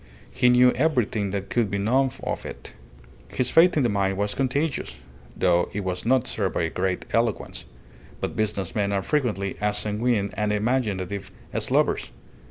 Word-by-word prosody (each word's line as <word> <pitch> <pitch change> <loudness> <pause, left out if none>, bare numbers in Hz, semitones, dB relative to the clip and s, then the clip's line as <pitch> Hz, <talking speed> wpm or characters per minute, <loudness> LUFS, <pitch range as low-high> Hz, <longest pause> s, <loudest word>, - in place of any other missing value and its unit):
He 125 - +3
knew 125 +1 +6
everything 125 -8 0
that 100 0 -4
could 115 -4 +1
be 100 - -1
known 130 +7 +2
of - - -3
it. - - -9 0.5
His 125 -1 0
faith 170 +1 +5
in 145 - +3
the 120 - +2
mine 95 -2 0
was 105 +1 -1
contagious, 140 +3 -1 0.4
though 85 0 +2
it 105 - -2
was 95 +2 -3
not 130 0 +3
served 100 -7 -2
by - - +1
a 80 - -1
great 90 0 -2
eloquence; 115 -2 -1 0.5
but - - -3
business 100 -5 -1
men 100 -2 0
are 100 -1 0
frequently 105 -8 -1
as 105 0 +1
sanguine 105 0 0
and 105 -1 -1
imaginative 105 -4 -1 0.2
as - - 0
lovers. - - +1
105 Hz, 175 wpm, -25 LUFS, 100-125 Hz, 0.5 s, knew